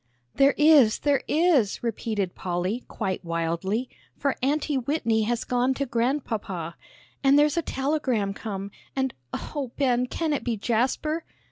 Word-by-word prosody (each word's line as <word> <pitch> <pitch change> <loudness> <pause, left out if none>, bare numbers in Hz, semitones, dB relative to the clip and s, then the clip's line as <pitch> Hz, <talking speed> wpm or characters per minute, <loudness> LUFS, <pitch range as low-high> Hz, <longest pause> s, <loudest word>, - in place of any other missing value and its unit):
"There 275 +1 +4
is, 295 -7 +6
there 285 -2 +1
is," 300 - +2
repeated 215 -5 -2
Polly, 185 +6 -2
quite 190 -4 -3
wildly, 170 +8 -1 0.3
"for 280 -2 0
Aunty 290 +2 +1
Whitney 245 -4 +1
has 235 +1 -1
gone 250 +1 +1
to 280 - -1
Grandpapa. 230 - -2 0.5
And 275 +1 +6
there's 295 0 +4
a 335 - +2
telegram 265 -9 -1
come, 200 -1 -5 0.2
and, 265 -2 0 0.2
oh, 280 -5 -4
Ben, 250 -3 +2
can 320 +3 -1
it 285 - -2
be 235 -3 -1
Jasper?" 260 +9 0
245 Hz, 140 wpm, -26 LUFS, 210-285 Hz, 0.5 s, is